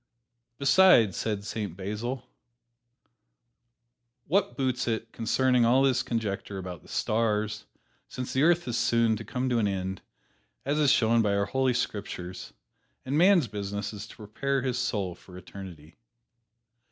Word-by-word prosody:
"Besides," 140 Hz, -, +5 dB
said 105 Hz, -2 st, -3 dB
Saint 105 Hz, -6 st, -4 dB
Basil, 110 Hz, +6 st, -4 dB, 2.0 s
"what 195 Hz, +5 st, 0 dB
boots 130 Hz, -3 st, -1 dB
it 115 Hz, 0 st, -2 dB
concerning 125 Hz, +2 st, +2 dB
all 125 Hz, +4 st, +4 dB
this 130 Hz, -2 st, +3 dB
conjecture 100 Hz, -4 st, -3 dB
about 90 Hz, -3 st, -7 dB
the -, -, -19 dB
stars, 110 Hz, -1 st, -1 dB, 0.4 s
since 125 Hz, 0 st, -6 dB
the 130 Hz, -, +1 dB
earth 170 Hz, +1 st, +3 dB
is 120 Hz, -1 st, -1 dB
soon 115 Hz, -2 st, +2 dB
to -, -, -6 dB
come 125 Hz, +1 st, -3 dB
to 120 Hz, -2 st, +2 dB
an 105 Hz, -, +2 dB
end, 95 Hz, -1 st, -3 dB, 0.6 s
as 145 Hz, +3 st, 0 dB
is 145 Hz, -3 st, +4 dB
shown 115 Hz, 0 st, +4 dB
by 100 Hz, -2 st, +1 dB
our 100 Hz, 0 st, +1 dB
Holy 130 Hz, +3 st, +1 dB
Scriptures, 100 Hz, -6 st, -4 dB, 0.5 s
and 135 Hz, +2 st, -2 dB
man's 175 Hz, -3 st, +5 dB
business 100 Hz, 0 st, -4 dB
is 105 Hz, +1 st, -7 dB
to -, -, -13 dB
prepare 130 Hz, +6 st, -2 dB
his 125 Hz, -2 st, -1 dB
soul 105 Hz, -8 st, -1 dB
for 90 Hz, +1 st, -14 dB
eternity?" 90 Hz, -4 st, -11 dB
115 Hz, 145 wpm, -28 LUFS, 100-130 Hz, 2.0 s, Besides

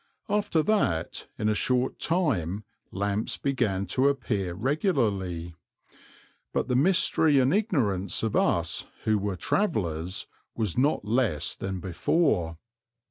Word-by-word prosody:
After 200 Hz, -6 st, +1 dB
that 90 Hz, -, 0 dB
in 105 Hz, -, -1 dB
a 110 Hz, -, +3 dB
short 125 Hz, +4 st, 0 dB
time 110 Hz, -, 0 dB, 0.3 s
lamps 100 Hz, +2 st, -1 dB
began 105 Hz, -8 st, 0 dB
to 130 Hz, +2 st, +3 dB
appear 105 Hz, -10 st, -1 dB
regularly, 105 Hz, -, 0 dB, 1.0 s
but -, -, 0 dB
the 125 Hz, -, 0 dB
mystery 160 Hz, -1 st, +4 dB
and 130 Hz, +2 st, +4 dB
ignorance 125 Hz, -, 0 dB
of 110 Hz, -, -1 dB
us -, -, +1 dB, 0.2 s
who 110 Hz, -1 st, +2 dB
were 100 Hz, -1 st, -2 dB
travellers 90 Hz, -, -1 dB, 0.3 s
was 110 Hz, -7 st, -1 dB
not 135 Hz, -4 st, +1 dB
less 110 Hz, -, +1 dB
than 95 Hz, -1 st, -4 dB
before. 90 Hz, -, 0 dB
110 Hz, 120 wpm, -27 LUFS, 95-140 Hz, 1.0 s, mystery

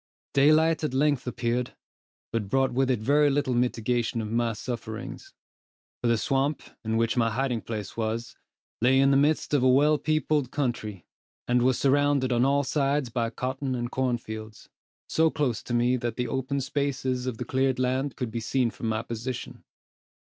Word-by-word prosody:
Daylight 155 Hz, +3 st, +4 dB
at 145 Hz, -4 st, -1 dB
length 145 Hz, -2 st, +1 dB
appeared, 120 Hz, 0 st, -2 dB, 0.6 s
but 110 Hz, -4 st, -2 dB
brought 135 Hz, +3 st, +2 dB
with 130 Hz, +1 st, +1 dB
it 125 Hz, -5 st, +1 dB
very 145 Hz, +5 st, +4 dB
little 140 Hz, -2 st, 0 dB
mitigation 120 Hz, -1 st, 0 dB
of 110 Hz, -1 st, -4 dB
my 115 Hz, 0 st, +1 dB
sufferings; 115 Hz, -, -6 dB, 0.7 s
for 120 Hz, -, 0 dB
the 115 Hz, -1 st, +3 dB
swamp, 135 Hz, +5 st, 0 dB, 0.2 s
in 110 Hz, 0 st, 0 dB
which 115 Hz, +2 st, +1 dB
my 115 Hz, -1 st, +3 dB
hiding 125 Hz, 0 st, -1 dB
place 105 Hz, -3 st, -6 dB
was, 115 Hz, +2 st, -3 dB, 0.5 s
lay 130 Hz, +3 st, +4 dB
in 135 Hz, 0 st, +5 dB
the -, -, +4 dB
midst 150 Hz, +2 st, +2 dB
of 145 Hz, -, +4 dB
a 130 Hz, -, +4 dB
well 145 Hz, +3 st, +4 dB
peopled 155 Hz, -3 st, 0 dB
country, 110 Hz, -, -3 dB, 0.4 s
and 125 Hz, 0 st, +3 dB
was 130 Hz, 0 st, +3 dB
surrounded 140 Hz, -1 st, +2 dB
on 120 Hz, 0 st, +3 dB
all 140 Hz, +1 st, +3 dB
sides 140 Hz, -1 st, 0 dB
by 115 Hz, -1 st, -1 dB
cotton 130 Hz, +2 st, -3 dB
and 120 Hz, 0 st, -3 dB
corn 130 Hz, -2 st, 0 dB
fields, 110 Hz, -1 st, -9 dB, 0.4 s
so 160 Hz, 0 st, +3 dB
close 140 Hz, -8 st, -1 dB
to 120 Hz, -, -6 dB
me 120 Hz, +2 st, +2 dB
that 120 Hz, -1 st, -3 dB
the 125 Hz, -1 st, -2 dB
open 130 Hz, +3 st, -2 dB
spaces 130 Hz, -2 st, -2 dB
of 125 Hz, -3 st, -3 dB
the -, -, -4 dB
cleared 130 Hz, 0 st, +1 dB
land 130 Hz, +1 st, 0 dB
could 125 Hz, -3 st, -4 dB
be 115 Hz, -, -3 dB
seen 120 Hz, +1 st, 0 dB
from 115 Hz, -, -5 dB
my 110 Hz, 0 st, -1 dB
position. 120 Hz, +2 st, -6 dB
125 Hz, 180 wpm, -27 LUFS, 115-140 Hz, 0.7 s, in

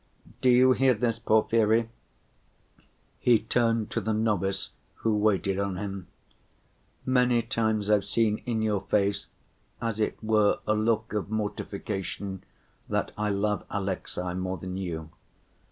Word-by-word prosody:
Do 130 Hz, -, +4 dB
you 125 Hz, +1 st, +6 dB
hear 130 Hz, 0 st, +4 dB
this, 115 Hz, 0 st, -1 dB
Porfiry?" 110 Hz, 0 st, +3 dB, 1.3 s
he 120 Hz, -2 st, +5 dB
turned 115 Hz, 0 st, 0 dB
to 115 Hz, -, -1 dB
the 110 Hz, +2 st, -1 dB
novice 100 Hz, -3 st, 0 dB, 0.2 s
who 110 Hz, -1 st, 0 dB
waited 100 Hz, -2 st, +1 dB
on 100 Hz, -2 st, -1 dB
him. 95 Hz, -3 st, -5 dB, 1.0 s
"Many 125 Hz, -2 st, +3 dB
times 110 Hz, -3 st, 0 dB
I've 105 Hz, -2 st, +4 dB
seen 110 Hz, -2 st, +1 dB
in 110 Hz, -2 st, 0 dB
your 105 Hz, -3 st, +1 dB
face 100 Hz, 0 st, 0 dB, 0.5 s
as 115 Hz, -2 st, -2 dB
it 110 Hz, -, 0 dB
were 110 Hz, -1 st, +3 dB
a 105 Hz, -, +2 dB
look 110 Hz, +1 st, 0 dB
of 105 Hz, -2 st, -2 dB
mortification 100 Hz, -2 st, -4 dB, 0.5 s
that -, -, -1 dB
I 105 Hz, 0 st, -1 dB
love 105 Hz, +1 st, 0 dB
Alexey 95 Hz, -2 st, -3 dB
more 95 Hz, +1 st, -3 dB
than 90 Hz, +2 st, -6 dB
you. 80 Hz, -4 st, -5 dB
105 Hz, 135 wpm, -27 LUFS, 100-115 Hz, 1.3 s, you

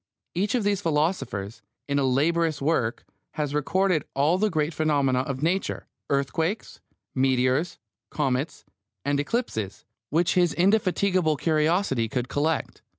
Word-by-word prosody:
Each 200 Hz, +7 st, 0 dB
of 240 Hz, -, +1 dB
these 200 Hz, -1 st, +1 dB
philosophers, 150 Hz, -, -1 dB, 0.3 s
in 140 Hz, 0 st, +1 dB
a -, -, +1 dB
laborious 155 Hz, +4 st, +2 dB
work, 135 Hz, -6 st, 0 dB, 0.3 s
has 150 Hz, -2 st, -2 dB
recorded 180 Hz, +3 st, +1 dB
all 150 Hz, +6 st, +3 dB
the 215 Hz, +1 st, +2 dB
great 155 Hz, -2 st, 0 dB
phenomena 140 Hz, -5 st, +2 dB
of 135 Hz, +1 st, -3 dB
Nature, 185 Hz, +4 st, -1 dB, 0.2 s
earthquakes, 160 Hz, -, -1 dB, 0.3 s
meteors, 130 Hz, +5 st, +1 dB, 0.3 s
comets, 140 Hz, +1 st, -2 dB, 0.4 s
and 145 Hz, 0 st, +1 dB
eclipses, 145 Hz, -, -2 dB, 0.2 s
which 165 Hz, +3 st, +2 dB
his 175 Hz, -2 st, +2 dB
indefatigable 185 Hz, -4 st, +2 dB
curiosity 155 Hz, -, +1 dB
could 125 Hz, -2 st, -2 dB
collect. 155 Hz, +3 st, -1 dB
155 Hz, 125 wpm, -26 LUFS, 135-175 Hz, 0.4 s, all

